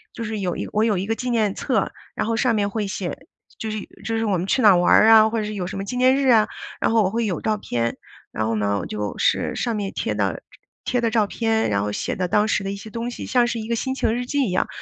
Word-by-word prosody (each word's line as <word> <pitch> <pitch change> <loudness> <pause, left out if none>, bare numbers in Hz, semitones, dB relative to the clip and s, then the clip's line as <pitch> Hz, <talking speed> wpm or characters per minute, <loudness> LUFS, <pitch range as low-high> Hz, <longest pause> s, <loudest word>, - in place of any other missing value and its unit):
就 230 - -5
是 215 -1 -3
有 180 -3 -2
一 - - -4
我 215 +1 +2
有 215 -4 +2
一 185 - -2
个 225 - 0
纪 250 +1 -4
念 220 -4 +1
册， - - 0 0.2
然 - - -1
后 230 - 0
上 235 -1 +2
面 200 -1 +1
会 210 -1 -2
写 190 -2 -5 0.3
就 220 - -4
是 215 - -3 0.3
就 225 +1 -1
是 225 - 0
我 200 -4 +1
们 180 - -3
去 255 - +2
哪 215 - +7
儿 180 - +5
玩 175 - +5
啊， 220 -1 +8
或 225 0 -1
者 - - -1
是 210 - -4
有 180 -2 -3
什 - - -6
么 195 - -3
纪 245 +5 -4
念 255 +1 +5
日 275 -1 +2
啊， 220 -3 +5 0.3
然 - - +2
后 225 -2 +4
我 185 - +1
会 230 +1 0
有 190 -5 -2
照 215 -1 0
片， 115 - -2 0.3
然 110 - -2
后 115 - 0
呢 100 -1 0
我 90 - -5
就 105 -1 -4
是 - - +1
上 235 -2 -1
面 200 -2 -3
贴 - - -2
的 - - -1 0.4
贴 245 -1 0
的 230 -1 +1
照 215 -3 +2
片， 225 0 0
然 100 -1 +1
后 105 - -2
写 - - -3
的 185 -1 -1
当 210 +4 +2
时 205 - 0
的 195 - -3
一 - - -4
些 200 +2 -9
东 235 +2 -4
西 - - -7
像 245 -2 +3
是 235 -1 -2
一 220 - -6
个 235 - 0
心 260 +3 -2
情 220 - 0
日 245 - -3
记 280 0 0
一 185 - -2
样， 185 - +1
215 Hz, 325 characters per minute, -22 LUFS, 190-230 Hz, 0.4 s, 啊